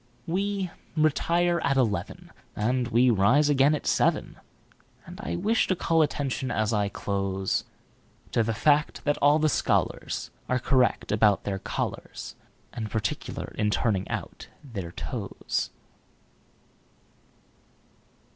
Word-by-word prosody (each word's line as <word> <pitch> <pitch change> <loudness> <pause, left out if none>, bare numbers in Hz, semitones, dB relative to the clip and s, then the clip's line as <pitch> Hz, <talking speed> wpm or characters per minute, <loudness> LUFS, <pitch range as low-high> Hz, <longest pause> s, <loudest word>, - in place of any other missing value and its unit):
We 195 +1 -1 0.3
retire 170 +3 +2
at 140 -1 +2
eleven, 105 -9 -1 0.2
And 125 +3 0
we 120 +2 +4
rise 125 +9 +4
again 145 +1 +4
at 150 - -6
seven; - - +1 0.7
And - - -9
I 85 - -3
wish 225 - +1
to 185 - +1
call 165 -1 +2
attention, 135 -3 -1
as 110 -2 0
I 105 -1 +1
close, 95 -1 -2 0.7
To - - +2
the 115 0 -1
fact 150 +5 +2
that 145 0 +1
all 145 +1 +5
the 155 0 +2
scholarsAre 125 -3 -1
correct 130 -2 +2
about 105 -1 +3
their 95 -1 -2
collars, - - -4 0.4
And 110 -3 -4
particular 110 -1 -3
in 105 -1 +2
turning 105 -3 0
out - - -5 0.2
their 100 - -6
toes. - - -3
125 Hz, 120 wpm, -27 LUFS, 105-150 Hz, 0.7 s, all